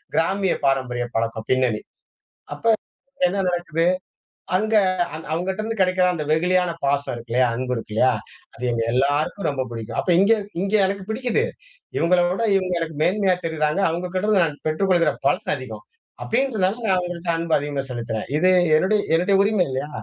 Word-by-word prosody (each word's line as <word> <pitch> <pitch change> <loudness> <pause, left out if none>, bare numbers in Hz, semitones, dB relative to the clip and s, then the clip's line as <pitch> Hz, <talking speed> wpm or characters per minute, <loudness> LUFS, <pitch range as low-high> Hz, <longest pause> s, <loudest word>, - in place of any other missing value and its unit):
கிராமிய 190 +3 +1
பாரம்பரிய 125 -3 0
பழக்கம் 115 -1 -2
பின்னணி. 125 -4 +1 0.7
அப்ப 230 0 +2 0.5
என்ன 195 +2 0
நடக்குது? 170 -2 -1 0.7
அங்க 215 +3 +1 0.4
அந் 160 - -8
அவங்கட்டருந்து 190 +7 -2
கிடைக்கிற 185 -1 +3
அந்த 155 -3 -3
வெகுளியான 180 +2 +2
பாசம் 140 -1 0
இருக்கு 115 0 -10
இல்லையா? 125 +1 +4
அன்பு 125 +1 -2
இருக்கு 115 -2 -7
இல்லையா? 115 +4 +4 0.5
அது 120 - -10
எங்க 115 -1 -1
எல்லாருக்கும் 145 +9 0
ரொம்ப 135 -2 -2
புடிக்கும். 115 -2 -6
அப்ப - - -2
இங்க 200 +4 +5 0.3
இங்க 200 +2 -2
எனக்கு 195 0 -2
பிடிக்குது. 245 - 0 0.5
இவங்களை 175 +1 +3
விட, 190 +6 -1
இவங்க 185 -2 0
எனக்கு 165 -2 -4
மேன்மையா 190 0 +2
தெரியிறாங்க. 155 +1 0
அவங்க 175 +2 -3
கிட்ட 185 +2 -1
இருந்து 210 -4 +4
நான் 150 -2 -5
பெற்றுக்கொள்ளுகிற 175 +2 +2 0.2
பலன் - - 0
அதிகம். - - -8 0.4
அப்படின்றனால, 225 -6 0
நான் 190 - +3
அவங்கள்ட்ட 175 -1 -3
அன்பு 165 -1 +1
அதிகமா 145 -1 -3
செலுத்துறேன். 115 -2 -4
இது 185 +3 +4 0.3
என்னுடைய 205 +6 +2 0.2
என்னுடைய 185 +4 +3
உரிமை 205 -3 +2
இல்லையா? 135 +3 -3
175 Hz, 160 wpm, -22 LUFS, 140-190 Hz, 0.7 s, இங்க